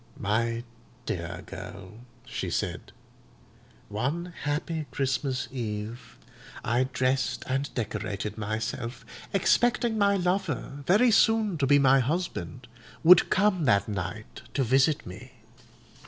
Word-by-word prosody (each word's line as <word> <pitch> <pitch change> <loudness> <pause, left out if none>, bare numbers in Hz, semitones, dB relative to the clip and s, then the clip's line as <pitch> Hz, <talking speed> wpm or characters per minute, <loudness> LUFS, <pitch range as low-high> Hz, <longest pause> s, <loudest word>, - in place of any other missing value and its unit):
"My 115 +3 0 0.4
dear 90 -2 -4
girl," 100 +2 -9 0.3
she 125 - -4
said, - - -3 1.0
"one 145 +12 -3
happy 150 +1 -2
Christmas 130 -1 -1
Eve 115 -2 -5 0.5
I 120 +3 +2
dressed 130 0 0
and 135 +2 -1
decorated 105 -2 -3
myself, 110 +4 -4 0.3
expecting 235 +3 +2
my 200 0 +4
lover, 170 -7 -2
very 225 +7 +5
soon 220 -3 +4
to 135 - +2
be 145 +1 +6
my 135 -1 +5
husband, 125 - -3 0.4
would 175 +1 +7
come 190 -4 +2
that 100 -6 +3
night 100 +1 -5
to 135 - +2
visit 135 +5 +3
me. 115 +9 -10
130 Hz, 110 wpm, -27 LUFS, 110-165 Hz, 1.0 s, would